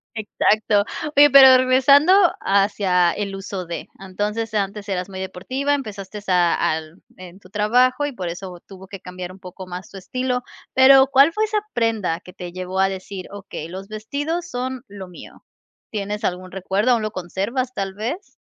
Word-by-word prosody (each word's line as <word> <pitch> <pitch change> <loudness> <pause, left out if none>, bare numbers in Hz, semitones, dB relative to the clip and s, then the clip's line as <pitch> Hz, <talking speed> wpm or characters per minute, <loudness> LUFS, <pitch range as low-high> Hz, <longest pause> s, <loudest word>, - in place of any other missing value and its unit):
exacto. 215 -1 +1 0.3
Oye, 290 +1 +8
pero 265 -1 +9
regresando 265 +6 +5 0.3
hacia 195 -3 +2
el 200 -1 -4
uso 195 -1 -6
de. 170 0 -6
Entonces, 210 +4 -4
antes 205 0 -2
eras 185 -1 -2
muy 190 -1 -7
deportiva, 260 +10 -2
empezaste 210 -6 -5
a 180 -2 +3 0.2
al 160 +2 -7
en 185 0 -12
tu 185 -2 -18
trabajo 250 +7 +2
y 290 - -3
por 185 -8 -6
eso 175 0 -7
tuvo 190 -1 -12
que 195 -1 -9
cambiar 180 0 -8
un 190 - -14
poco 185 0 -10
más 180 +1 -8
tu 195 - -11
estilo. 250 +5 -2 0.3
Pero 265 0 +7
¿cuál 275 +3 +5
fue 430 +5 0
esa 425 0 0
prenda 220 -8 0
que 180 - -15
te 175 -1 -8
llevó 185 +1 -3
a 195 - +3
decir: 190 -1 -7
"Okey, 195 -5 -8
los 190 +2 -8
vestidos 290 +11 -4
son 255 +1 -4
lo 195 -2 -9
mío" 180 - -13 0.5
¿Tienes 210 0 -4
algún 185 0 -3
recuerdo? 195 +5 0
¿Aún 235 -3 +2
lo 215 - -2
conservas 210 +8 -3
tal 195 -4 -3
vez? 240 - -5
200 Hz, 175 wpm, -21 LUFS, 185-255 Hz, 0.5 s, pero